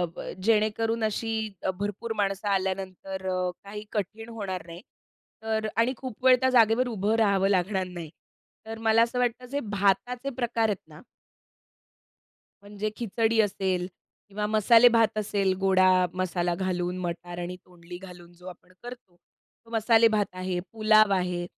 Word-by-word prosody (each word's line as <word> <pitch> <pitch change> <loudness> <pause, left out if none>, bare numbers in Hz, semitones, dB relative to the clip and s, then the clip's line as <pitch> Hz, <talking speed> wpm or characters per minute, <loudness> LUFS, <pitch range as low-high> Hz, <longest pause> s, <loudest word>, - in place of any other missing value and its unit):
ब, - - -7 0.2
जेणेकरून 225 +1 +1
अशी 220 +1 -1 0.5
भरपूर 205 +3 -3
माणसं 195 0 -1
आल्यानंतर 190 0 -3
अ, 185 -1 -1
काही 210 +1 -8
कठीण 225 +2 -4
होणार 195 -6 -5
नाही. 170 +1 -10 0.6
तर 220 -1 -1
आणि 230 +3 +2
खूप 255 -1 -8
वेळ 255 -1 +8
त्या 260 0 +2
जागेवर 230 +2 +4
उभं 215 -1 0
राहावं 200 -3 +3
लागणार 190 0 0
नाही. 170 -3 -8 0.6
तर 225 0 -6
मला 220 +1 +5
असं 235 +2 +1
वाटतं 250 0 -1
जे 285 - -1
भाताचे 240 +7 0
प्रकार 235 -2 0
आहेत 200 -3 -2
ना? 150 0 -13 1.6
म्हणजे 205 +1 -4
खिचडी 225 0 0
असेल 190 -3 -1 0.4
किंवा 210 +1 -3
मसाले 225 +3 +6
भात 230 -2 +3
असेल, 200 -2 0
गोडा 185 -1 +4
मसाला 175 -1 -1
घालून 180 0 -2
मटार 175 0 -6
आणि 175 +1 -5
तोंडली 175 0 -11
घालून 175 -2 -13
जो 180 +1 -15
आपण 180 0 -12
करतो. 245 -7 -11 0.5
तो - - -19
मसाले 225 0 +4
भात 215 -2 +1
आहे, 185 -1 -3
पुलाव 215 -1 +4
आहे, 180 -2 -1
205 Hz, 145 wpm, -27 LUFS, 185-225 Hz, 1.6 s, वेळ